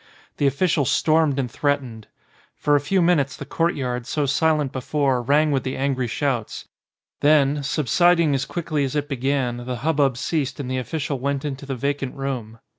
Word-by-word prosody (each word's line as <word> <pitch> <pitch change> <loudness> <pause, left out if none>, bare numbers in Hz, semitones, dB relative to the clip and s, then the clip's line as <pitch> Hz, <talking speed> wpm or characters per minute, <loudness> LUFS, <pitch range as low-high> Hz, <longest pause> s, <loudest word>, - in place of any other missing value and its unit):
The 145 - +2
official 155 +2 +1
stormed 155 +1 +2
and 125 -4 -2
threatened. 130 -7 -2 0.5
For 145 - +2
a - - +4
few 180 +5 +1
minutes 150 -6 +2
the - - -7
courtyard, 125 -8 -1
so 145 +1 0
silent 150 0 +1
before, 135 -1 0
rang 145 +5 +3
with 135 -2 +1
the 130 - -4
angry 130 -2 0
shouts; 125 -3 -2 0.5
then, 145 -1 +3
subsiding 155 +4 +2
as 135 0 0
quickly 155 -4 -2
as 135 +1 -2
it 145 -1 -1
began, 135 -2 -1
the 125 +1 -4
hubbub 145 -5 +2
ceased 145 -1 -2
and 130 -2 -4
the 130 - 0
offi 145 +6 -4
cial 145 -3 -2
went 140 +2 -2
into 140 -1 -5
the 135 - -3
vacant 140 +1 -2
room. 125 -5 -4
140 Hz, 180 wpm, -23 LUFS, 130-150 Hz, 0.5 s, a